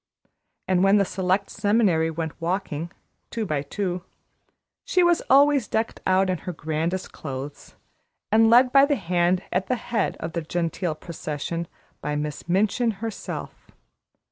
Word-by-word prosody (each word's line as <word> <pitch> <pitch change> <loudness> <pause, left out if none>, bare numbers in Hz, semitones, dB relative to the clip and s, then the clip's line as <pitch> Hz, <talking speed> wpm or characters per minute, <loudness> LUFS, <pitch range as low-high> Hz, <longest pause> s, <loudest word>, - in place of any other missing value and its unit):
And 185 -1 +3
when 195 +1 +5
the 200 - +3
Select 185 +1 0
Seminary 200 -6 +2
went 160 0 -5
walking, 170 -2 -2 0.4
two 225 -2 -3
by 150 -6 -1
two, 180 +4 -3 0.8
she 365 - +2
was 345 -1 +4
always 280 -3 +5
decked 220 +1 -2
out 190 +1 +3
in 185 -2 -1
her 180 - -5
grandest 160 +4 -2
clothes, 140 0 -7 0.6
and 225 +1 +5
led 250 +2 +6
by 275 +1 +7
the 290 - +2
hand 180 -2 +1
at 185 +1 0
the 255 - +1
head 230 -4 -2
of 160 0 -5
the 170 - -1
genteel 165 +1 -2
procession, 165 +1 -5 0.3
by 150 +1 -2
Miss 150 +2 -4
Minchin 215 +5 +2
herself. 225 0 -6
185 Hz, 145 wpm, -24 LUFS, 165-220 Hz, 0.8 s, by